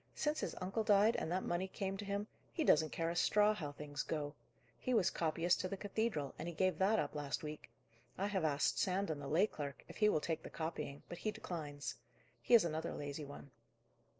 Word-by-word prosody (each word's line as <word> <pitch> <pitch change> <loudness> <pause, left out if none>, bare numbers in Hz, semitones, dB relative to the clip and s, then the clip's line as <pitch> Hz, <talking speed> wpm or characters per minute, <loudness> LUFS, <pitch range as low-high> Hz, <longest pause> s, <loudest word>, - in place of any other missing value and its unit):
Since 305 +1 0
his - - -2
uncle 195 +5 -1
died, 210 +1 +5
and 160 - -2
that 185 +1 0
money 175 +2 0
came 195 0 -3
to 205 - -5
him, 200 +1 -1 0.3
he 320 - 0
doesn't 155 - +5
care 165 +2 -1
a - - -4
straw 210 +4 +4
how 155 -9 -4
things 145 0 -5
go. 145 -2 -2 0.5
He 255 - 0
was 190 -4 +4
copyist 165 +2 +2
to 185 - -1
the 195 - -4
cathedral, 205 - -1
and - - -4
he 170 - -4
gave 185 -2 +2
that 200 +4 +4
up - - 0
last 145 +2 -3
week. 150 0 -6 0.5
I 195 - 0
have 200 -4 0
asked 140 -5 +2
Sandon, 185 -5 +1
the 140 - -5
lay 165 +8 +4
clerk, 145 -9 -6
if - - -10
he 210 -1 +5
will 155 - +3
take 160 +1 -2
the - - -8
copying, 160 -3 -4
but 175 - -7
he 215 - -1
declines. 160 -9 -4 0.5
He 240 - +6
is 215 -7 +7
another 160 0 -2
lazy 145 +1 -4
one." 140 -1 -10
175 Hz, 220 wpm, -37 LUFS, 150-200 Hz, 0.5 s, is